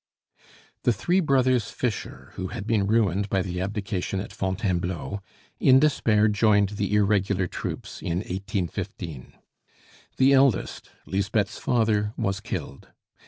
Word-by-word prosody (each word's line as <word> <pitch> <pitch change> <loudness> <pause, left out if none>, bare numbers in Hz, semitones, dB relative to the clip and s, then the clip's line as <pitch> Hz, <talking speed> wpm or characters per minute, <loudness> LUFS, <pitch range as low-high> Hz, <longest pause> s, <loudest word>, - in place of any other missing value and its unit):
The 120 - +3
three 175 - +1
brothers 130 - +2
Fischer, 120 -5 -4
who 95 - -4
had 105 0 -6
been 105 -3 +1
ruined 100 -2 +2
by 95 -2 +1
the 90 -1 -4
abdication 100 -1 -2
at 95 0 -6
Fontainebleau, 95 -1 -2 0.4
in 130 0 +6
despair 110 -7 +3
joined 105 -1 +3
the 105 0 -1
irregular 100 -2 +2
troops - - -6
in 85 0 -2
1815. 95 - -5 0.8
The 135 +1 +5
eldest, 135 -7 +2 0.2
Lisbeth's 100 +1 -1
father, 110 -3 +1
was 95 0 -1
killed. 70 - -6
100 Hz, 120 wpm, -25 LUFS, 95-110 Hz, 0.8 s, in